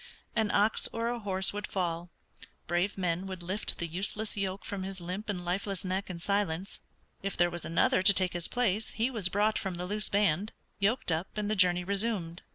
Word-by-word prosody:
An 220 -2 +2
ox 210 +2 +3
or 230 +1 -1
a 240 0 -2
horse 190 -3 +3
would 205 0 -4
fall, 175 -2 -2 0.6
brave 175 +4 0
men 180 0 -1
would 185 -2 -6
lift 190 +5 -1
the 170 - -2
useless 200 +5 -3
yoke 195 -1 -2
from 200 -4 -4
his 190 0 -5
limp 185 +5 -5
and 180 -3 -3
lifeless 195 +2 -2
neck 190 +2 -2
in 175 -2 -5
silence. 195 -1 -1 0.4
If 195 -1 -3
there 175 0 +4
was 175 -1 -4
another 165 +2 +3
to 200 +2 +8
take 185 -1 +3
his 175 -1 -1
place 225 -3 0
he 230 +4 0
was 210 -7 +1
brought 210 +3 +2
from 190 -2 -3
the 175 +1 -4
loose 210 +2 -1
band, 200 0 +2 0.3
yoked 205 0 +1
up 165 +6 -2
and 210 0 -1
the - - +2
journey 180 -2 +4
resumed. 195 -3 -1
195 Hz, 205 wpm, -30 LUFS, 175-210 Hz, 0.6 s, to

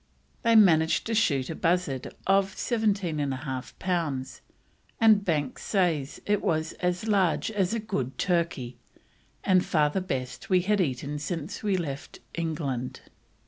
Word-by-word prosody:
They 230 -1 +3
managed 160 -7 +5
to 225 - -2
shoot 145 -12 +2
a - - -4
bustard 165 -7 0
of 195 0 +2
17 205 -8 0
1/2 130 -2 -3
pounds, 160 -8 -2 0.6
and 220 -3 +6
Banks 150 -7 -1
says 165 -8 0
it 205 -1 +1
was 160 -1 0
"as 180 +3 -1
large 195 -2 +2
as 200 0 0
a - - -1
good 135 - -3
turkey, 165 -9 -1 0.6
and 185 -1 +4
far 150 -2 +2
the 190 - -1
best 130 -8 -4
we 185 -2 +4
had 205 +2 +2
eaten 145 -1 -2
since 165 +2 -4
we 200 -3 +1
left 145 -6 -5 0.2
England." 150 -7 -3
170 Hz, 140 wpm, -27 LUFS, 145-195 Hz, 0.6 s, and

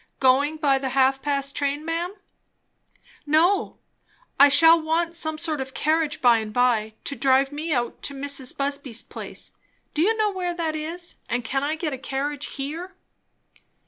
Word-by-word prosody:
Going 275 +4 +3
by 280 -3 +2
the 265 0 -2
half 270 0 +3
past 280 -1 -1
six - - -4
train, 285 +1 -1
ma'am?" 340 +4 -2 1.1
"No. 340 +6 +2 0.6
I 285 +1 +9
shall 325 +3 +6
want 330 +2 0
some 315 -2 -2
sort 310 -3 -1
of 265 - -5
a - - -20
carriage 310 +2 0
by 240 -2 +6
and 215 -1 -5
by, 220 -2 +1
to 280 - -2
drive 270 +2 +3
me 310 +3 -4
out 240 -4 -1
to 280 - -3
Mrs. 275 -2 -2
Busby's 275 -4 -2
place; - - -7 0.4
do 305 - 0
you 440 +6 +3
know 430 -1 +2
where 360 -2 -3
that 325 -2 -2
is? 335 +3 -5
And 245 0 -1
can 270 +4 -1
I 300 +2 0
get 315 -2 -3
a 260 - -5
carriage 280 +1 -3
here?" 325 +7 -6
290 Hz, 175 wpm, -24 LUFS, 270-325 Hz, 1.1 s, I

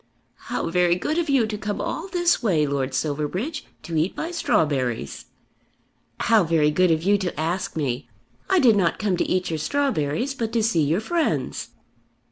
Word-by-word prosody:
"How 165 - -2
very 175 0 +3
good 305 - -1
of 330 -3 -2
you 270 -5 +4
to 215 -1 -4
come 210 -1 -3
all 335 - -3
this 350 -2 +1
way, 170 -10 +2
Lord 135 -2 -2
Silverbridge, 160 - -2 0.2
to 165 - -5
eat 160 +4 0
my 330 - -3
strawberries." 130 - 0 1.0
"How 225 -3 +4
very 160 -2 +2
good 180 +4 +3
of 160 0 +1
you 200 +2 +3
to 180 -5 -3
ask 170 +4 -2
me! 135 -4 -2 0.4
I 380 - +4
did 245 -9 +5
not 185 -4 +1
come 205 -4 0
to - - -1
eat 185 -2 0
your 160 - -2
strawberries 245 - 0
but 230 -4 -3
to 230 -2 +2
see 210 -7 +2
your 155 +7 +1
friends." 335 +7 -1
180 Hz, 180 wpm, -23 LUFS, 155-235 Hz, 1.0 s, did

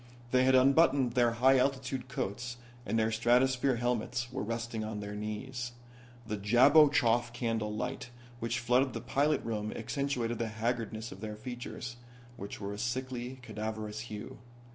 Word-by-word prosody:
They 130 0 +4
had 130 0 +5
unbuttoned 135 -1 +5
their 120 -2 +3
high 130 +3 +5
altitude 130 -1 -1
coats 120 +1 -3 0.3
and 115 - +1
their 110 0 +2
stratosphere 125 +3 +3
helmets 120 0 -1
were 130 - -3
resting 115 0 -3
on 110 -1 -4
their 105 0 -5
knees. 120 +4 -4 0.5
The 105 -1 -3
Jablochoff 120 +1 +5
candle 115 -3 -1
light 125 +3 -4 0.3
which 115 +1 -1
flooded 125 +2 +2
the 115 - -4
pilot 140 +5 +1
room 110 -2 -2
accentuated 120 -1 -2
the 115 - 0
haggardness 110 0 -3
of 95 - -10
their 105 -1 -5
features, 120 +1 -6 0.4
which 100 -3 -7
were 100 0 -4
a 100 - -7
sickly 125 +1 -3
cadaverous 110 -1 -4
hue. 105 +1 -7
120 Hz, 150 wpm, -31 LUFS, 110-130 Hz, 0.5 s, had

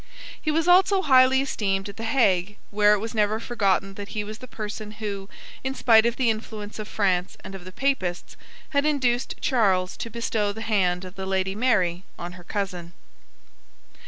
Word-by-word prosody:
He 310 - -2
was 320 +2 +1
also 380 +2 +5
highly 260 -1 +5
esteemed 195 -7 -1
at 200 - -9
the 225 - -5
Hague, 205 -6 +2
where 210 0 +5
it - - +3
was 220 +2 -5
never 215 0 +1
forgotten 195 -4 0
that 200 0 -7
he 210 - -3
was 215 +2 -8
the 255 - -10
person 210 -1 -6
who, 200 -2 -5 0.3
in 265 0 -2
spite 230 -3 +5
of 235 - -1
the 245 -3 +2
influence 215 -1 -7
of 215 - -5
France 185 -4 0
and 195 - -8
of 190 -2 -9
the 185 - -9
Papists, 185 -8 -2 0.3
had 280 -2 +1
induced 260 -5 +1
Charles 195 -8 +2
to 230 - -5
bestow 220 -2 -1
the 220 - -8
hand 190 -5 +1
of 180 - -9
the 190 -1 -6
Lady 190 0 0
Mary 190 -6 +1
on 175 +1 -6
her 180 0 -12
cousin. 180 -3 -4
210 Hz, 190 wpm, -25 LUFS, 190-240 Hz, 0.3 s, also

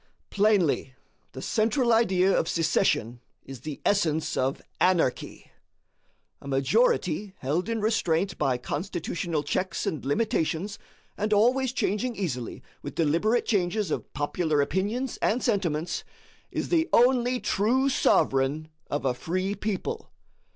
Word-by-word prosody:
Plainly, 195 -10 +2 0.4
the 130 - -7
central 235 +2 +2
idea 190 -4 +3
of - - +1
secession 125 - +1 0.2
is 135 -2 -9
the 150 +1 -6
essence 160 -6 +1
of 130 +2 0 0.2
anarchy. 175 -8 0 0.9
A - - -10
majority 185 - +1
held 155 - -1
in 225 -1 -1
restraint 195 -4 +1
by 130 -2 +1
constitutional 170 - -3
checks 185 +4 -2
and 155 - -3
limitations, 180 +3 -1 0.4
and 210 +1 -1
always 245 +5 +3
changing 235 0 -1
easily 125 - -4 0.2
with - - -7
deliberate 170 +10 +2
changes 200 0 0
of - - -3
popular 150 +1 0
opinions 205 - -1
and 240 +4 0
sentiments, 175 -8 -1 0.5
is - - -3
the 330 -1 +2
only 250 0 +4
true 245 +7 +1
sovereign 145 - +2 0.2
of 145 -1 -2
a 130 - +2
free 185 +9 -2
people. 220 - -4
185 Hz, 125 wpm, -27 LUFS, 150-220 Hz, 0.9 s, only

